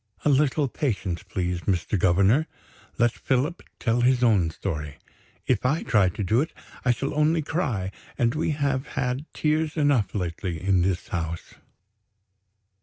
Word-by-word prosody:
"A -, -, +5 dB
little 145 Hz, +1 st, +3 dB
patience, 105 Hz, -, -2 dB
please, 90 Hz, -2 st, -3 dB
Mr. 95 Hz, +1 st, 0 dB
Governor; 100 Hz, -, +3 dB, 0.5 s
let 120 Hz, 0 st, +4 dB
Philip 135 Hz, +9 st, -1 dB, 0.2 s
tell 120 Hz, 0 st, +1 dB
his 125 Hz, 0 st, +3 dB
own 100 Hz, -8 st, +4 dB
story. 75 Hz, -4 st, -5 dB, 0.5 s
If 125 Hz, -5 st, +1 dB
I 145 Hz, +6 st, +1 dB
try 100 Hz, -5 st, +3 dB
to 100 Hz, -, -4 dB
do 110 Hz, +7 st, +3 dB
it, 160 Hz, -, -3 dB, 0.3 s
I 125 Hz, -, +1 dB
shall 125 Hz, +3 st, 0 dB
only 155 Hz, +2 st, +2 dB
cry 120 Hz, -, -1 dB, 0.3 s
and 120 Hz, -1 st, +2 dB
we 155 Hz, +2 st, -1 dB
have 140 Hz, -3 st, 0 dB
had 130 Hz, +3 st, -2 dB
tears 155 Hz, +1 st, 0 dB
enough 145 Hz, -10 st, +2 dB
lately, 85 Hz, -2 st, -3 dB
in 95 Hz, +1 st, +2 dB
this 95 Hz, +3 st, -1 dB
house." 85 Hz, -5 st, -4 dB
120 Hz, 150 wpm, -25 LUFS, 95-145 Hz, 0.5 s, A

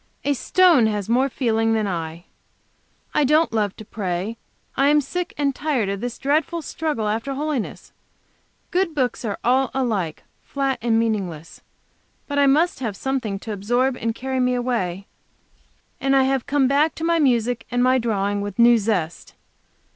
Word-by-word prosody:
A 285 Hz, -, +2 dB
stone 320 Hz, -2 st, +4 dB
has 210 Hz, -3 st, -2 dB
more 260 Hz, +4 st, +3 dB
feeling 225 Hz, -3 st, +1 dB
than 220 Hz, -1 st, +1 dB
I. 170 Hz, -2 st, -4 dB, 0.9 s
I 300 Hz, -, +3 dB
don't 305 Hz, 0 st, +3 dB
love 210 Hz, -3 st, 0 dB
to 215 Hz, -, -11 dB
pray. 195 Hz, +1 st, -3 dB, 0.4 s
I 275 Hz, -, +3 dB
am 295 Hz, +1 st, +5 dB
sick 350 Hz, +6 st, -3 dB
and 280 Hz, -1 st, +1 dB
tired 265 Hz, -9 st, -1 dB
of 200 Hz, 0 st, -3 dB
this 245 Hz, 0 st, -4 dB
dreadful 315 Hz, +4 st, 0 dB
struggle 295 Hz, -8 st, -2 dB
after 230 Hz, +6 st, -2 dB
holiness; 290 Hz, -5 st, -4 dB, 0.8 s
good 360 Hz, -3 st, 0 dB
books 255 Hz, -4 st, -1 dB
are 205 Hz, -2 st, -2 dB
all 260 Hz, +2 st, +2 dB
alike, 210 Hz, -12 st, -1 dB, 0.2 s
flat 275 Hz, -1 st, -2 dB
and 225 Hz, -1 st, +2 dB
meaningless. 195 Hz, -8 st, -2 dB, 0.7 s
But 285 Hz, -1 st, -1 dB
I 280 Hz, -, +5 dB
must 310 Hz, +5 st, +2 dB
have 220 Hz, -7 st, -4 dB
something 260 Hz, -7 st, -2 dB
to 220 Hz, -, -5 dB
absorb 245 Hz, +6 st, 0 dB
and 230 Hz, -2 st, -3 dB
carry 260 Hz, +1 st, -3 dB
me 250 Hz, 0 st, +2 dB
away, 200 Hz, -7 st, -2 dB, 0.9 s
and 270 Hz, 0 st, +2 dB
I 270 Hz, -, +5 dB
have 265 Hz, -1 st, 0 dB
come 285 Hz, -2 st, +2 dB
back 290 Hz, +4 st, +2 dB
to 320 Hz, -, -6 dB
my 335 Hz, 0 st, +2 dB
music 245 Hz, -4 st, +1 dB
and 245 Hz, +1 st, +1 dB
my 255 Hz, +1 st, +4 dB
drawing 205 Hz, -3 st, -1 dB
with 205 Hz, -1 st, -5 dB
new 235 Hz, 0 st, +6 dB
zest. 185 Hz, -6 st, -2 dB
245 Hz, 170 wpm, -22 LUFS, 215-275 Hz, 0.9 s, new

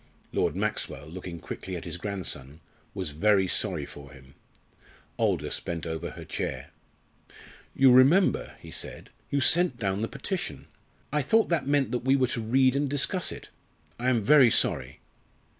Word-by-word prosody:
Lord -, -, 0 dB
Maxwell, -, -, -2 dB
looking 85 Hz, +1 st, -8 dB
quickly 95 Hz, +3 st, -7 dB
at 85 Hz, -, -7 dB
his 85 Hz, 0 st, -4 dB
grandson, 85 Hz, -7 st, -4 dB, 0.4 s
was 95 Hz, -6 st, -3 dB
very 95 Hz, +5 st, +3 dB
sorry 90 Hz, -6 st, 0 dB
for 70 Hz, -1 st, -12 dB
him. 65 Hz, -1 st, -16 dB, 0.9 s
Aldous -, -, 0 dB
bent 85 Hz, -2 st, -5 dB
over 80 Hz, -2 st, -4 dB
her -, -, -10 dB
chair. -, -, -4 dB, 1.0 s
"You 135 Hz, -1 st, +6 dB
remember," 140 Hz, +10 st, +4 dB
he -, -, -12 dB
said, -, -, -4 dB, 0.2 s
"you 140 Hz, -, 0 dB
sent 170 Hz, -2 st, +4 dB
down 100 Hz, -3 st, -1 dB
the 115 Hz, -, -1 dB
petition. -, -, -5 dB, 0.5 s
I 150 Hz, -, +2 dB
thought 220 Hz, -, +2 dB
that 165 Hz, -6 st, 0 dB
meant 140 Hz, -4 st, +2 dB
that 125 Hz, -, 0 dB
we 135 Hz, +2 st, +2 dB
were 130 Hz, -2 st, +3 dB
to 120 Hz, -, -2 dB
read 130 Hz, +4 st, +3 dB
and 140 Hz, 0 st, 0 dB
discuss 145 Hz, +7 st, 0 dB
it. -, -, -9 dB, 0.5 s
I 125 Hz, +2 st, +1 dB
am 120 Hz, -4 st, +1 dB
very 135 Hz, +1 st, +7 dB
sorry." -, -, 0 dB
115 Hz, 160 wpm, -27 LUFS, 85-135 Hz, 1.0 s, very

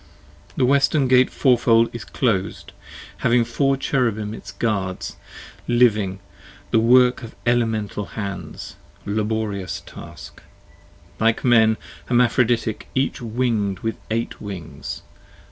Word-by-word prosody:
The -, -, +3 dB
Western 140 Hz, +1 st, +3 dB
Gate 130 Hz, 0 st, +5 dB
fourfold, 115 Hz, -3 st, +3 dB
is 120 Hz, -1 st, -7 dB
clos'd: 105 Hz, -7 st, -1 dB, 0.5 s
having 120 Hz, 0 st, +2 dB
four 135 Hz, +3 st, +1 dB
Cherubim 110 Hz, -6 st, -1 dB
Its 100 Hz, -, -9 dB
guards, 100 Hz, -3 st, -2 dB, 0.5 s
living, 110 Hz, -6 st, +3 dB, 0.5 s
the 115 Hz, -, +4 dB
work 125 Hz, +2 st, +5 dB
of 115 Hz, -2 st, -10 dB
elemental 110 Hz, -4 st, 0 dB
hands, 100 Hz, -3 st, -6 dB, 0.3 s
laborious 105 Hz, -2 st, -2 dB
task: -, -, -11 dB, 0.8 s
Like 115 Hz, 0 st, +2 dB
Men, 110 Hz, -3 st, +4 dB, 0.3 s
hermaphroditic, 120 Hz, -2 st, +1 dB
each 135 Hz, 0 st, 0 dB
winged 110 Hz, -5 st, -1 dB
with 115 Hz, 0 st, -2 dB
eight 115 Hz, +1 st, -3 dB
wings. 95 Hz, -6 st, -7 dB
115 Hz, 105 wpm, -22 LUFS, 105-125 Hz, 0.8 s, Gate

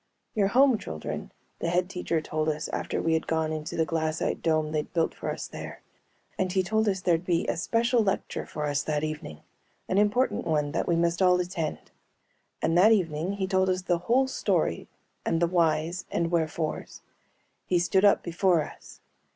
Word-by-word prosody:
"You're 200 Hz, -2 st, +2 dB
home, 255 Hz, +2 st, +4 dB
children," 80 Hz, 0 st, -6 dB, 0.3 s
the 170 Hz, -, -1 dB
Head 180 Hz, +1 st, +1 dB
Teacher 180 Hz, -3 st, -2 dB
told 155 Hz, 0 st, -1 dB
us 150 Hz, 0 st, -3 dB
after -, -, -2 dB
we 165 Hz, -, +1 dB
had 160 Hz, -, 0 dB
gone 160 Hz, -1 st, 0 dB
into 155 Hz, 0 st, -5 dB
the 160 Hz, -, +2 dB
glassite 160 Hz, 0 st, -1 dB
dome 155 Hz, -1 st, +1 dB
they'd 150 Hz, -1 st, -2 dB
built 165 Hz, -1 st, +1 dB
for -, -, -5 dB
us -, -, -4 dB
there. -, -, -9 dB, 0.6 s
And 185 Hz, -1 st, +1 dB
he 190 Hz, 0 st, +2 dB
told 220 Hz, +2 st, +1 dB
us 190 Hz, -2 st, -1 dB
there'd 170 Hz, -2 st, +2 dB
be 175 Hz, -2 st, +1 dB
a -, -, -1 dB
special 230 Hz, +6 st, +2 dB
lecture 195 Hz, -1 st, -2 dB
for 150 Hz, -, -4 dB
us 145 Hz, -1 st, 0 dB
that 150 Hz, 0 st, -1 dB
evening, 155 Hz, -, -5 dB, 0.5 s
an 190 Hz, -, +2 dB
important 210 Hz, +5 st, +1 dB
one 150 Hz, -2 st, +1 dB
that -, -, -1 dB
we 170 Hz, -, +2 dB
must 170 Hz, +2 st, +1 dB
all 180 Hz, -1 st, +5 dB
attend. 175 Hz, -3 st, -4 dB, 0.7 s
And 165 Hz, -, +2 dB
that 215 Hz, +5 st, +7 dB
evening 175 Hz, -3 st, +1 dB
he 200 Hz, -1 st, -2 dB
told 190 Hz, 0 st, +2 dB
us 185 Hz, 0 st, 0 dB
the 175 Hz, -2 st, +1 dB
whole 260 Hz, +3 st, +4 dB
story 265 Hz, -, 0 dB, 0.4 s
and 165 Hz, -, 0 dB
the 170 Hz, -, +4 dB
whys 170 Hz, 0 st, +1 dB
and 170 Hz, 0 st, -1 dB
wherefores. 160 Hz, -2 st, -2 dB, 0.7 s
He 180 Hz, -, +2 dB
stood 175 Hz, +3 st, +2 dB
up 205 Hz, -, +5 dB
before 175 Hz, -1 st, +2 dB
us. -, -, -12 dB
170 Hz, 190 wpm, -27 LUFS, 155-190 Hz, 0.7 s, that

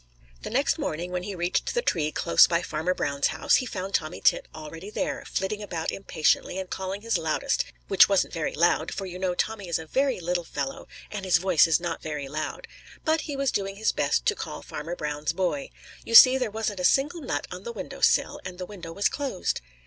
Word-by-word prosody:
The -, -, -6 dB
next -, -, +1 dB
morning 175 Hz, +3 st, -3 dB
when 180 Hz, 0 st, -2 dB
he 195 Hz, +2 st, -5 dB
reached 175 Hz, -, -1 dB
the 485 Hz, -, +1 dB
tree 155 Hz, -, 0 dB
close 85 Hz, -, +5 dB
by 170 Hz, +1 st, 0 dB
Farmer 160 Hz, +4 st, -1 dB
Brown's 140 Hz, -3 st, 0 dB
house, -, -, +2 dB
he 255 Hz, 0 st, -2 dB
found 195 Hz, -2 st, -5 dB
Tommy 155 Hz, -1 st, -1 dB
Tit -, -, +2 dB
already 160 Hz, +5 st, -9 dB
there, 210 Hz, -, -3 dB
flitting 200 Hz, +2 st, -2 dB
about 170 Hz, -6 st, -3 dB
impatiently 180 Hz, -1 st, 0 dB
and 190 Hz, -1 st, -4 dB
calling 190 Hz, +1 st, -4 dB
his 230 Hz, +1 st, 0 dB
loudest, -, -, 0 dB, 0.2 s
which 195 Hz, 0 st, +6 dB
wasn't 195 Hz, -1 st, +2 dB
very 165 Hz, -3 st, -2 dB
loud, 170 Hz, +3 st, +2 dB
for 195 Hz, -, -4 dB
you 180 Hz, -1 st, -7 dB
know 185 Hz, -1 st, 0 dB
Tommy 205 Hz, -1 st, -2 dB
is 170 Hz, -, +1 dB
a 160 Hz, -, -7 dB
very 265 Hz, -, 0 dB
little 175 Hz, 0 st, -1 dB
fellow, 140 Hz, -4 st, -5 dB, 0.2 s
and 210 Hz, -2 st, -5 dB
his 185 Hz, -2 st, +4 dB
voice 175 Hz, -2 st, +4 dB
is 165 Hz, -1 st, +3 dB
not 175 Hz, 0 st, -4 dB
very 150 Hz, -3 st, -4 dB
loud. 155 Hz, +3 st, -5 dB, 0.4 s
But 320 Hz, 0 st, +2 dB
he 285 Hz, -, -2 dB
was 275 Hz, -1 st, 0 dB
doing 195 Hz, -1 st, -2 dB
his 220 Hz, +2 st, +1 dB
best -, -, 0 dB
to 435 Hz, -, +3 dB
call -, -, -7 dB
Farmer 165 Hz, +4 st, -6 dB
Brown's 150 Hz, -1 st, -2 dB
boy. 190 Hz, +10 st, -1 dB, 0.3 s
You 230 Hz, -, -1 dB
see, 255 Hz, +2 st, +11 dB
there 250 Hz, -4 st, 0 dB
wasn't 210 Hz, -2 st, -3 dB
a -, -, -3 dB
single 290 Hz, -, +2 dB
nut 260 Hz, -, -2 dB
on -, -, -6 dB
the 475 Hz, -, -6 dB
window -, -, -8 dB
sill, -, -, +3 dB
and 185 Hz, -1 st, -7 dB
the 180 Hz, -, -5 dB
window 180 Hz, -4 st, -9 dB
was 200 Hz, +4 st, +1 dB
closed. 275 Hz, -, -2 dB
185 Hz, 220 wpm, -26 LUFS, 165-215 Hz, 0.4 s, see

